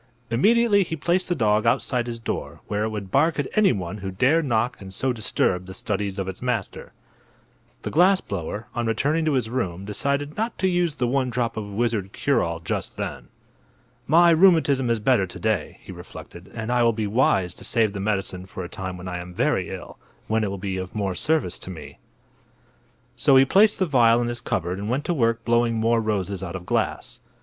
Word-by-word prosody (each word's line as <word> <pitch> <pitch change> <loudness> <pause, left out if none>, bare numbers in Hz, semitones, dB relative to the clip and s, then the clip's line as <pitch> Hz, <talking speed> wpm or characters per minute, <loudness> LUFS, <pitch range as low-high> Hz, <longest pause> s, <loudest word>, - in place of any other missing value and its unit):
Immediately 210 - +4
he 165 - -4
placed 175 +4 0
the 175 - +1
dog 110 -4 +2
outside 120 +1 +1
his 120 -1 -4
door, 115 - -5
where 105 +1 -2
it - - -1
would 100 -3 -6
bark 160 +4 +3
at 145 - 0
anyone 105 - +1
who 95 0 -5
dared 135 - +2
knock 120 -2 0
and 95 -1 -9
so 130 +7 -1
disturb 95 -5 -1
the 95 - -8
studies 100 0 -3
of 95 -1 -3
its 95 -1 -6
master. 120 -5 -3 0.9
The - - -4
glass 185 +4 +5
blower, 100 - -5
on 120 -1 -2
returning 145 +8 +1
to 155 - +1
his 125 -5 +1
room, 100 -7 -3
decided 140 +7 -2
not 225 +2 -2
to 190 - +1
use 175 -4 +1
the 125 -4 -1
one 130 +1 0
drop 120 -1 -1
of 110 - -4
wizard 105 -3 -1
cure 140 -4 +1
all 85 0 -2
just 85 - -4
then. - - -5 0.8
"My 170 +3 +6
rheumatism 160 -7 +4
is 115 -1 +1
better 105 -3 +2
to - - -9
day," 110 -7 -1
he - - -10
reflected, 85 +3 -11
"and 110 +1 -4
I 125 0 +2
will 115 -1 +4
be 110 0 -2
wise 100 -5 +2
to - - -11
save 110 -3 +1
the 100 - -5
medicine 95 -2 -2
for 95 - -7
a 90 - -7
time 95 -1 -6
when 90 +1 -8
I 90 -1 -4
am 90 0 -9
very - - 0
ill, - - -8 0.3
when 110 0 +1
it 105 - -1
will 100 - -4
be 95 0 -3
of 95 +2 -6
more 100 -3 -1
service 140 - 0
to - - -8
me." 85 -8 -10 1.2
So 135 - +4
he 130 0 +7
placed 205 +9 +4
the 190 - +1
vial 120 -6 +4
in 120 0 -1
his 120 0 -4
cupboard 90 -4 -2
and 105 +2 -4
went 135 +4 -1
to 175 - 0
work 115 -5 0
blowing 120 0 +2
more 115 +1 +2
roses 100 -3 -2
out 90 -1 -5
of 90 -1 -7
glass. - - -2
115 Hz, 215 wpm, -24 LUFS, 95-135 Hz, 1.2 s, he